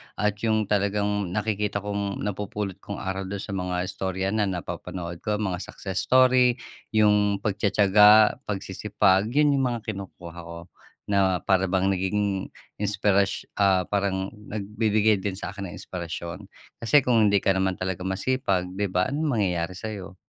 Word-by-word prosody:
at 105 0 +1
yung 110 -2 +1
talagang 100 -2 0
nakikita 105 -1 -1
kong 100 -1 -3
napupulot 105 -1 -4
kong 100 0 -7
aral 95 0 -3
dun 100 0 -5
sa 110 - -7
mga 90 -2 -2
istorya 95 0 -3
na 105 -1 +1
napapanood 85 -1 -5
ko 105 0 +1
mga 95 -4 -1
success 95 -1 -4
story, 130 -1 +5 0.4
yung 105 -2 +3
pagtitiyaga, 105 +1 +5
pagsisipag. 100 0 +1
Yun 145 -1 +4
yung 135 - +1
mga 120 - -3
kinukuha 90 -3 -9
ko 85 0 -8 0.5
na 95 -3 +1
para 95 -1 +2
bang 95 +1 +1
naging 95 +1 -1 0.3
inspirash 100 -1 +1 0.2
ah, 95 -2 +4
parang 95 -1 -1 0.2
nagbibigay 105 0 +1
din 95 -1 -3
sa 100 - -5
akin 100 0 -6
ng 85 - -9
inspirasyon. 85 +2 -6 0.3
Kasi 130 +4 +4
kung 115 -4 +4
hindi 100 -1 +2
ka - - +4
naman 95 -1 0
talaga 90 0 -4
masipag 95 -2 -1
di 100 +2 -2
ba 90 +7 0
anong 155 +2 -1
mangyayari 90 -3 -1
sayo 100 -2 -7
100 Hz, 150 wpm, -25 LUFS, 95-105 Hz, 0.5 s, story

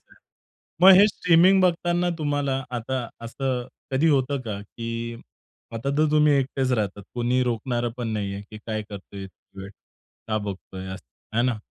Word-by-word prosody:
नाही. - - -20 0.7
मग 190 - +11
हे 205 - +8
स्ट्रीमिंग 180 0 +4
बघताना 175 0 +2
तुम्हाला 145 -3 0 0.2
आता 130 +3 -3 0.3
असं 125 0 -2 0.3
कधी 145 +5 +3
होतं 140 -1 +2
का, 100 -2 -4
की 115 +2 -8 0.9
आता 115 +5 -2
तर 155 0 +4
तुम्ही 150 0 +4
एकटेच 135 -1 -1
राहतात. 105 -3 -1
कोणी 125 +1 +1
रोखणार 120 0 -1
पण 120 -2 -2
नाहीये, 100 -2 -3
की 110 - -9
काय 110 -1 -2
करतोय, 100 -1 -8
कितीवेळ 95 +1 -12 0.6
का 110 -1 +1
बघतोय 95 -1 -7
असं. - - -12 0.3
हे 120 - +4
ना? 125 -2 +1
125 Hz, 155 wpm, -24 LUFS, 110-145 Hz, 0.9 s, मग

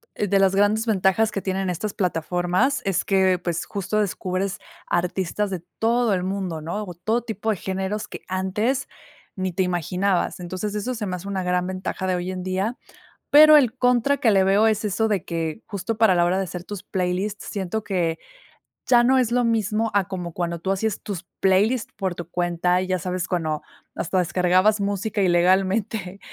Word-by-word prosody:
de 200 -1 +1
las 195 0 +3
grandes 210 +3 +3
ventajas 210 0 +2
que 195 - -3
tienen 190 -1 -1
estas 200 +4 -4
plataformas 180 - 0
es 195 -3 +1
que, 190 -2 +2
pues, 175 -2 -3
justo 205 +2 -2
descubres 190 -1 -2 0.3
artistas 185 +3 -1
de 180 -3 -5 0.2
todo 235 -1 +2
el 185 - 0
mundo, 185 -4 -3
¿no?, 175 +7 -3
o 180 -4 -7
todo 220 +7 -1
tipo 220 -1 -4
de 215 - +2
géneros 190 +3 -3
que - - -9
antes 210 +9 -1 0.5
ni 185 -1 -2
te 190 +2 +1
imaginabas. 180 +2 0
Entonces 185 +4 -4
eso 230 +5 -2
se 220 -3 -4
me 185 - -2
hace 180 +2 -8
una 195 -1 -2
gran 180 0 0
ventaja 185 0 -4
de 185 - +1
hoy 180 +1 -3
en 185 -1 -5
día. 190 +6 -2 0.5
Pero 305 +1 +9
el 255 -4 +3
contra 250 +2 +3
que 230 -5 +3
le 195 -1 +4
veo 200 +3 +4
es 215 -1 +1
eso 210 +2 +1
de 200 -6 0
que 165 +3 -3
justo 205 +1 -4
para 220 -4 +4
la 175 - +4
hora 180 +2 +1
de 195 - 0
hacer 180 -1 -7
tus 205 -1 -7
playlists 190 +3 -2
siento 200 +2 -3
que, 175 -5 -1 0.7
ya 240 -1 +5
no 265 +1 +4
es 240 -2 +2
lo 245 0 +2
mismo 225 -1 0
a 195 -3 +1
como 175 -3 -5
cuando 170 -1 -3
tú 190 - -4
hacías 200 +2 -1
tus 190 -4 -6
playlist 205 +6 +2
por 190 -3 -2
tu 175 0 -8
cuenta, 175 +1 +1
¿ya 185 -1 -1
sabes?, 180 0 -3
cuando 155 -4 -1 0.3
hasta 185 +2 -1
descargabas 185 +4 +2
música 200 +1 -1
ilegalmente 190 +2 +1
190 Hz, 190 wpm, -23 LUFS, 180-215 Hz, 0.7 s, Pero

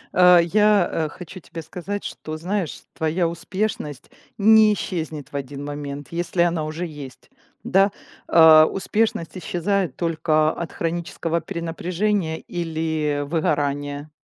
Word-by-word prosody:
А, 180 0 +7
я, 210 +4 +4
э, 160 -2 -1
хочу 180 +3 -10
тебе 165 -1 -9
сказать, 190 +5 -5
что 155 0 -6
знаешь, 180 0 -3
твоя 165 +2 0
успешность 170 -3 -4 0.3
не 215 0 +6
исчезнет 160 -7 -4
в - - -11
один 140 +1 -5
момент, 145 -1 -6
если 175 +1 0
она 170 -2 0
уже 160 +3 -4
есть. 145 -5 -10 0.3
Да? 195 +1 +3 0.4
А, 160 -1 +8
успешность 195 -1 -1
исчезает 180 -1 -1
только 155 -2 +1
от 170 0 -6
хронического 170 0 -2
перенапряжения 170 +1 -2
или 160 -3 -2
выгорания. 145 -2 -1
165 Hz, 120 wpm, -22 LUFS, 155-180 Hz, 0.4 s, А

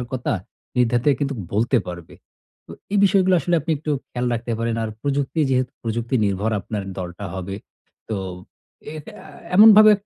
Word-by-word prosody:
সমস্যার 125 - -3
কথা 130 -1 -1 0.4
নির্দ্বিধায় 125 +3 +3
কিন্তু 140 -1 -1 0.2
বলতে 115 +5 +2
পারবে। 85 -2 -8 0.5
তো - - -15 0.2
এই 205 - +3
বিষয়গুলো 190 -1 +4
আসলে 175 +1 0
আপনি 165 - -4
একটু 155 +1 -4 0.2
খেয়াল 125 0 -2
রাখতে 120 +1 -3
পারেন। 115 0 -1
আর 110 - -2
প্রযুক্তি 140 +2 -1
যেহেতু 130 0 +1
প্রযুক্তি 115 +2 -2
নির্ভর 100 +3 0
আপনার 105 0 -4 0.2
দলটা 90 +2 -6
হবে। 95 +1 -5 0.5
তো 110 - -2 0.8
এটা 150 - -9 0.4
এমনভাবে 215 0 +9
125 Hz, 155 wpm, -22 LUFS, 110-145 Hz, 0.8 s, এমনভাবে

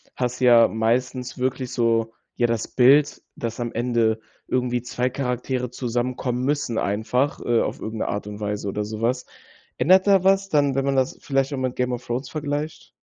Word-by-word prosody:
hast 125 -1 -2
du 130 - +2
ja 120 -2 +7
meistens 125 +3 -1
wirklich 130 0 -2
so 115 -2 +1 0.2
ja, 120 - +2
das 115 -1 -1
Bild, 140 +4 +4
dass 115 0 -5
am 120 -1 -3
Ende 115 -2 +1 0.3
irgendwie 125 -1 0
2 125 +1 -1
Charaktere 125 -1 -2
zusammenkommen 125 0 -2
müssen 140 -5 -1
einfach, 115 +7 0
äh, 120 -1 +2
auf - - -2
irgend 110 0 -5
'ne - - -1
Art 100 - -3
und 105 0 -7
Weise 105 -1 -3
oder 105 +1 -2
sowas, 115 +4 -2 0.5
ändert 185 +4 +5
da 195 -2 +5
was 195 0 +3
dann, 145 -5 +2
wenn 135 0 0
man 140 -1 +1
das 130 -1 0
vielleicht 135 0 0
auch 140 - -2
mit 130 -1 -2
“Game 125 0 0
of 125 0 -4
Thrones“ 125 +4 -3
vergleicht? 150 0 -4
125 Hz, 190 wpm, -23 LUFS, 115-135 Hz, 0.5 s, ja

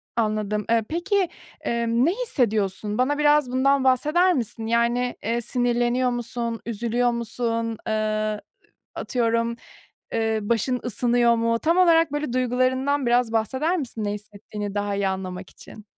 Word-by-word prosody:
Anladım, 210 -2 -1
eee, 230 -1 +3
peki, 370 +2 0 0.3
emm, 235 +2 +1
ne 340 - +3
hissediyorsun? 215 - -1
Bana 280 +4 +1
biraz 295 -3 +3
bundan 275 +1 +2
bahseder 305 +8 +3
misin? 225 -4 -3
Yani, 235 +2 +1
eee, 235 +1 -1
sinirleniyor 245 +1 +1
musun, 235 -1 -3
üzülüyor 235 +2 0
musun, 230 -1 -2
eee, 215 -1 -1 0.5
atıyorum, 230 -1 0 0.6
eee, 225 -1 0
başın 235 +4 0
ısınıyor 240 0 +2
mu? 230 0 +1
Tam 335 +6 +1
olarak 335 -2 +5 0.3
duygularından 255 +2 +1
biraz 240 -1 +2
bahseder 260 - 0
misin? 235 -7 -4
Ne 205 - -1
hissettiğini 205 0 -7
daha 205 0 -1
iyi 200 -1 +1
anlamak 185 -1 -5
için. 215 - -14
235 Hz, 130 wpm, -24 LUFS, 220-255 Hz, 0.6 s, olarak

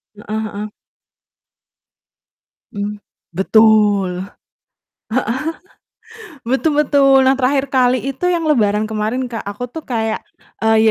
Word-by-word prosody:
Heeh 215 +1 -4
heeh. 210 +1 -4 2.1
Hmm, 205 +1 -4 0.3
betul, 205 -1 +3 2.1
heeh, 325 -9 -16
betul 265 +6 0
betul, 275 -2 +4
nah 265 +1 +3
terakhir 270 +1 +1
kali 255 -1 +2
itu 275 +6 -3
yang 345 -2 +1
Lebaran 210 -6 +2
kemarin, 220 +4 -2
Kak, 225 -3 -6
aku 235 +5 -5
tuh 320 +1 -8
kayak, 225 -3 -2 0.3
eee, 220 0 +4
230 Hz, 105 wpm, -18 LUFS, 210-270 Hz, 2.1 s, betul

